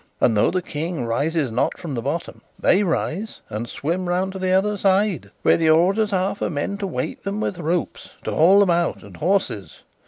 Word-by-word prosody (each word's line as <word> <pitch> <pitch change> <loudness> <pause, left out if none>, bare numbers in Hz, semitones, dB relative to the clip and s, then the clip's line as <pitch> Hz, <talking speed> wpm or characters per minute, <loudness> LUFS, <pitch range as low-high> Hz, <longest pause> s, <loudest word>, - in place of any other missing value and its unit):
And 115 - +3
though 105 - +4
the 185 0 -1
King 160 -4 -3
rises 140 +4 0
not 120 - 0
from 165 -5 -6
the 120 - -2
bottom, 145 +7 -4 0.2
they 190 - +3
rise 195 +2 -2
and 110 +3 -4
swim 175 +4 -2
round 185 +2 0
to 190 - -6
the 185 0 0
other 200 +3 +2
side, 195 -1 +1
where - - +5
the 160 -1 +2
orders 195 +7 +3
are 190 0 +1
for - - -3
men 170 +6 -3
to 200 - -2
wait 155 -3 -4
them 200 +2 -3
with 190 -4 -2
ropes, 170 +1 -2
to - - -3
haul 190 +6 +6
them 195 -3 +3
out, 170 0 0
and - - -12
horses. 155 - -1
175 Hz, 210 wpm, -22 LUFS, 155-195 Hz, 0.2 s, haul